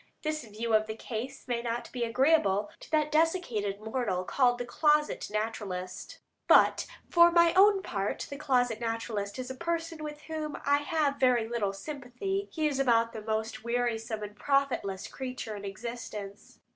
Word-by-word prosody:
This 310 -1 -2
view 225 +2 -3
of 215 0 +4
the 220 - -4
case 250 +5 -6
may 240 -1 -1
not 235 0 -3
be 245 -2 -2
agreeable 230 -5 +2
to - - -13
that 305 -1 +1
desiccated 305 - +1
mortal 220 -4 -2
called 245 +4 +2
the 245 - -4
"closet 300 +3 +2
naturalist," 205 -4 -4 0.3
but - - +5 0.2
for 340 0 +7
my 340 -1 +5
own 390 0 +6
part 200 - -2
the 280 - -7
closet 250 -6 +1
naturalist 225 -3 -3
is 255 0 -5
a - - -3
person 330 +1 -3
with 300 0 -6
whom 310 -1 -4
I 285 0 +4
have 290 -1 0
very 245 -4 +3
little 225 -4 -1
sympathy. 295 - -4
He 315 -2 -1
is 280 -2 -1
about 230 -3 +3
the 220 - -6
most 220 +3 -3
wearisome 235 -2 -1
and 205 0 -7
profitless 260 -8 0
creature 255 -4 -5
in 200 0 -7
existence. 210 -1 -7
245 Hz, 165 wpm, -30 LUFS, 220-300 Hz, 0.3 s, for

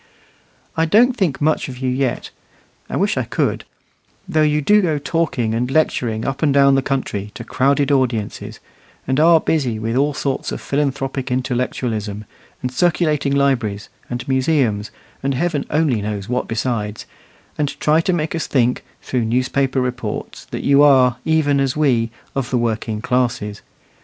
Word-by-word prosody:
I 160 - +2
don't 235 +9 +4
think 185 - 0
much 155 -1 +1
of 125 - -8
you 130 0 -3
yet 130 -1 -2 0.6
I - - -3
wish - - +1
I - - +1
could - - -1 0.6
though 155 - +1
you 150 0 +3
do 210 +8 +4
go 160 -5 +1
talking 140 -6 -1
and 120 +2 -1
lecturing 120 -6 0
up 135 -1 -3
and 155 -3 +3
down 140 0 +5
the 135 - +3
country 125 -7 -2
to 115 - -7
crowded 140 +4 +1
audiences, 125 -6 -1 0.5
and 130 +2 0
are 165 +1 +6
busy 135 -9 0
with 115 +2 -2
all 140 +2 +1
sorts 140 -2 -2
of - - -4
philanthropic 135 -2 -2
intellectualism, 120 -4 -2 0.4
and 125 - -2
circulating 150 -2 +1
libraries 120 -8 0 0.2
and 120 0 -5
museums, 130 -6 +1 0.3
and 135 0 -1
Heaven 150 0 -1
only 150 -8 +1
knows 100 -1 -4
what 125 +1 -1
besides, 110 -2 -2 0.5
and 145 -1 -2
try 155 +2 +3
to 185 - 0
make 160 -3 -1
us 165 - -2
think, 125 -2 +1 0.2
through 125 -3 -1
newspaper 130 +3 0
reports, 125 -4 -4
that - - -6
you 140 0 +5
are, 130 -4 +5
even 155 -3 +2
as 135 0 0
we, 125 -7 +2 0.2
of 135 -3 -2
the 125 - +1
working 110 -2 -2
classes. 120 -5 -1
135 Hz, 160 wpm, -19 LUFS, 120-150 Hz, 0.6 s, are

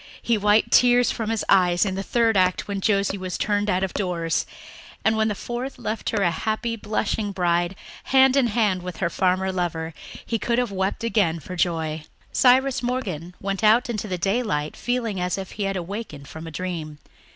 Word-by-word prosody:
He 235 - +1
wiped 210 +1 +3
tears 245 0 +5
from 225 -2 -3
his 225 -1 -1
eyes 180 -1 +4
in 190 - -1
the 190 - -3
third 230 +2 +2
act 185 -1 +2
when 200 -1 -3
Josie 200 -1 +1
was 185 -1 -4
turned 205 0 0
out 185 -1 +1
of 190 - -2
doors 170 -4 -1 0.6
and, 220 - +4
when 220 0 +2
the 210 - -1
fourth 245 +5 -5
left 220 +1 -3
her 205 -3 0
a 175 - +3
happy, 220 +6 -2
blushing 215 -1 -2
bride, 175 -1 0 0.3
hand 265 0 +5
in 270 -3 +4
hand 210 -5 +1
with 180 -2 -6
her 170 -3 -1
farmer 190 0 +1
lover, 165 -3 -2 0.3
he 230 - -1
could 235 +2 0
have 245 -3 0
wept 190 +3 -2
again 200 -8 +1
for 180 +5 -8
joy. 160 -3 -1 0.3
Cyrus 260 +1 +4
Morgan 185 -10 -3
went 195 +1 -3
out 230 +3 +4
into 215 -2 -3
the 185 -2 -2
daylight 195 -5 -1
feeling 235 -5 -2
as 180 +1 -1
if 190 -1 -6
he 205 - -3
had 195 0 -1
awakened 175 -6 -6
from 160 +2 -9
a - - -7
dream. 160 -3 -5
195 Hz, 195 wpm, -24 LUFS, 180-225 Hz, 0.6 s, tears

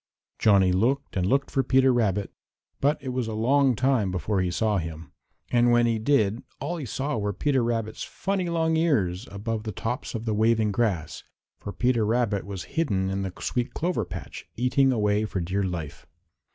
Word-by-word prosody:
Johnny 100 -3 +5
looked 120 +10 0
and 90 -1 +1
looked 135 +5 +1
for 135 - +2
Peter 130 0 +4
Rabbit, 105 -4 0 0.5
but 145 +3 +2
it 130 - -4
was 125 -2 -2
a 110 - -4
long 130 +3 +3
time 125 -4 +2
before 95 +2 -1
he 90 - 0
saw 105 +3 +1
him, 80 -1 -7 0.4
and 120 0 +4
when 120 0 +4
he 115 -1 +1
did 110 -3 +2 0.2
all 170 +6 -3
he 145 -6 -5
saw 135 +2 -2
were 105 0 -1
Peter 135 +4 +1
Rabbit's 115 -2 -2
funny 190 -2 -2
long 160 -1 +1
ears 115 - +1
above 105 +2 -3
the 110 0 -5
tops 120 +6 -4
of 115 0 -4
the 110 - 0
waving 110 0 +2
grass, 100 -8 -1 0.4
for 100 - -6
Peter 120 0 +1
Rabbit 110 -3 0
was 95 -2 -5
hidden 95 -13 0
in 95 0 -2
the 95 -1 -3
sweet 125 -1 -2
clover 170 -8 0
patch, 85 - -8
eating 130 +3 +3
away 105 -3 +1
for 105 -3 -3
dear 90 +4 -1
life. 85 -6 -5
115 Hz, 190 wpm, -26 LUFS, 100-130 Hz, 0.5 s, Johnny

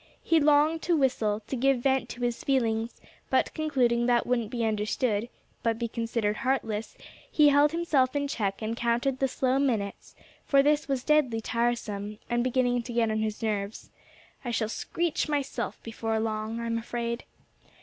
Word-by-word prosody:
He 330 - +4
longed 300 +2 +4
to 340 -2 +2
whistle, 220 -6 +1
to 265 - -4
give 265 0 +2
vent 265 -3 +1
to 245 - -8
his 240 -1 -1
feelings; 230 -4 0 0.3
but - - +2
concluding 250 -6 +1
that 240 -1 +3
wouldn't 235 -3 0
be 235 -1 -1
understood, 215 +1 0 0.3
but 230 -1 0
be 235 0 -2
considered 225 -2 -1
heartless, 225 -5 -2 0.3
he 300 -1 +6
held 290 +1 +5
himself 300 -6 +1
in 285 0 0
check, 205 -6 -2
and 220 +1 -2
counted 240 +3 0
the 270 - +2
slow 260 +1 0
minutes, 220 -8 -2 0.3
for 275 -1 +4
this 295 +1 +2
was 270 -3 -1
deadly 295 -7 +2
tiresome, 215 -3 -2
and 240 0 +2
beginning 245 -1 +1
to 240 +1 -7
get 230 -2 +2
on 215 - 0
his 215 +1 -3
nerves. 210 -1 -3 0.5
"I 245 - -4
shall 225 -2 -1
screech 330 +6 -2
myself 285 -2 -2
before 225 -1 -2
long, 220 +1 -2
I'm 230 0 -1
afraid." 235 +1 -4
240 Hz, 170 wpm, -28 LUFS, 225-270 Hz, 0.5 s, he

